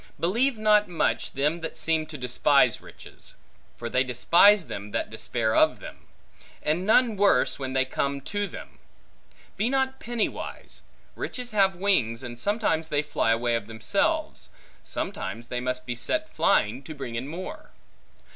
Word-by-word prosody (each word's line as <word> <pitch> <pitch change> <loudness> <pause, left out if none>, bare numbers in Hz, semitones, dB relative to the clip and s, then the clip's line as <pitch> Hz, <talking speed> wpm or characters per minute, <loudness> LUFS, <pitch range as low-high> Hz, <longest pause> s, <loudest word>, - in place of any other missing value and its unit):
Believe 235 +9 +1
not 210 -1 +4
much, 115 -10 -1
them 150 +5 0
that 160 - -5
seem 160 -1 +1
to 150 - -7
despise 125 0 +3
riches; - - -14 0.4
for 120 - -5
they 130 +2 +2
despise 170 - +5
them, 100 +1 -7
that - - -2
despair 110 0 -1
of - - +4
them; - - -11 0.6
and 170 +5 0
none 230 0 +4
worse, 200 -6 +3
when 130 -1 -4
they 130 -1 +2
come 140 +1 -2
to 205 +7 -2
them. - - -11 0.8
Be 215 +5 +1
not 265 0 0
penny 235 -2 -1
wise; - - -8 0.3
riches 250 -2 -5
have 195 -3 +3
wings, 135 - +1
and 120 -1 -7
sometimes 185 - 0
they 145 -1 0
fly 150 -6 0
away 120 +1 +1
of 115 -3 -2
themselves, 205 - -1 0.3
sometimes 120 - -5
they 125 - -2
must 125 0 -3
be 125 - -3
set 315 - -1
flying, 125 - +2
to 155 +3 -9
bring 135 -4 -6
in 120 +3 -4
more. 175 +5 -7
155 Hz, 160 wpm, -26 LUFS, 125-205 Hz, 0.8 s, despise